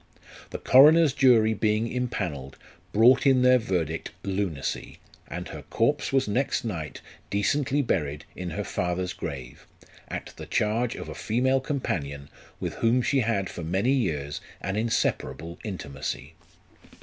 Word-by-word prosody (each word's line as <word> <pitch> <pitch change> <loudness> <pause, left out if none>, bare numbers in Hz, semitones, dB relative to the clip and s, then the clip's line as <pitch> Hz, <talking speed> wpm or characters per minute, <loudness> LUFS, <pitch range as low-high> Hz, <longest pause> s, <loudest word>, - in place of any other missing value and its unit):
The - - -5
coroner's 150 +3 +6
jury 120 -6 +5
being 110 +1 +1
impanelled, 90 - -3 0.4
brought 125 +6 +5
in 130 -2 +5
their 125 0 +6
verdict 85 -7 -2
lunacy, 95 -7 -3 0.3
and - - -6
her - - -7
corpse 145 +6 +1
was 135 -2 +2
next 120 +4 0
night 85 -9 -5 0.3
decently 140 +8 +1
buried 75 - -1
in 90 -1 -5
her 105 +4 -3
father's 90 -1 -2
grave, 65 -7 -7 0.4
1 - - -3
at - - -10
the - - -8
charge 115 +3 0
of - - -7
a - - -6
female 130 +4 +1
com 140 0 -2
panion, 70 - -3 0.3
with - - -3
whom 120 +2 +2
she 135 - +2
had 110 -5 0
for 85 - -7
many 95 +10 +1
years 75 - -1 0.2
an 95 +1 -3
inseparable 85 - -1
intimacy. 75 -10 -5
105 Hz, 145 wpm, -26 LUFS, 85-125 Hz, 0.4 s, coroner's